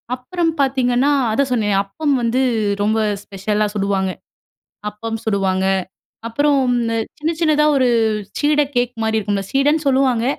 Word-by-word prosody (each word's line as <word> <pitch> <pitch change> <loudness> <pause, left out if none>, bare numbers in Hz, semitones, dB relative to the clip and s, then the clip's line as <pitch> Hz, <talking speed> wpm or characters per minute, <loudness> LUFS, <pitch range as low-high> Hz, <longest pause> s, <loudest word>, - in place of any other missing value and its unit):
அப்புறம் 330 +6 -2
பார்த்தீங்கன்னா, 260 0 +2 0.2
அதான் 275 +5 +1
சொன்னேன் 210 -4 +1
அப்பம் 285 +10 -2
வந்து 235 +2 +1 0.4
ரொம்ப 215 +2 +1 0.2
ஸ்பெஷலா 205 +2 -1
சுடுவாங்க. 195 -2 0 0.8
அப்பம் 225 +2 -5
சுடுவாங்க, 190 -3 0 0.6
அப்புறம் 285 +5 +2 0.2
இந்த 230 -1 -1 0.2
சின்ன, 310 +2 0
சின்னதா 305 -2 +3
ஒரு 260 -2 +3 0.5
சீட 295 0 +3
கேக் 245 0 +1
மாரி 220 0 +1
இருக்கும்ல! 200 -1 -2
சீடன்னு 295 +3 +2
சொல்லுவாங்க. 260 -3 +2
240 Hz, 125 wpm, -19 LUFS, 210-280 Hz, 0.8 s, சின்னதா